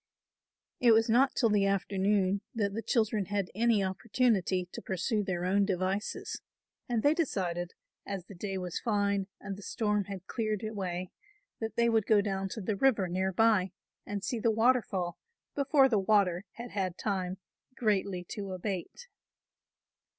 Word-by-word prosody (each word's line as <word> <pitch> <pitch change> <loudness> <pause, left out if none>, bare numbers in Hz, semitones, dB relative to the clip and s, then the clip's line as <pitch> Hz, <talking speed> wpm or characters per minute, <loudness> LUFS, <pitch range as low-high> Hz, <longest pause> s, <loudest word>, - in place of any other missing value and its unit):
It 240 -2 +6
was 225 +1 +3
not 260 +4 +4
till 230 -4 +3
the 200 -1 +3
afternoon 195 0 +1
that 200 -3 0
the 225 - -3
children 220 -4 +1
had 200 -1 -2
any 225 0 +3
opportunity 190 -2 +1
to - - -7
pursue 195 +4 -1
their 180 -2 -2
own 200 +2 +3
devices 190 +1 -2 0.5
and 235 -2 0
they 290 - +5
decided, 180 - -2 0.3
as 195 -3 -5
the 200 - -11
day 195 +1 -4
was 180 -2 -3
fine 200 -3 0
and 200 -1 -5
the 200 - -11
storm 210 -1 0
had 195 -2 -7
cleared 215 -2 -2
away, 185 -4 -4 0.5
that 225 0 -4
they 235 0 +3
would 225 -3 +2
go 215 -2 +5
down 195 -1 -1
to 220 - -5
the 200 +2 -1
river 215 -4 +3
near 185 +2 0
by 195 -2 +3 0.3
and 205 -1 -5
see 240 - -2
the 230 - +2
waterfall 220 -6 +1 0.3
before 280 -1 +4
the 225 -6 +2
water 195 -2 +2
had 240 0 -8
had 185 -3 -2
time 190 -3 -2 0.4
greatly 200 -6 0
to 200 -2 -5
abate. 190 - -5
200 Hz, 160 wpm, -30 LUFS, 190-225 Hz, 0.5 s, It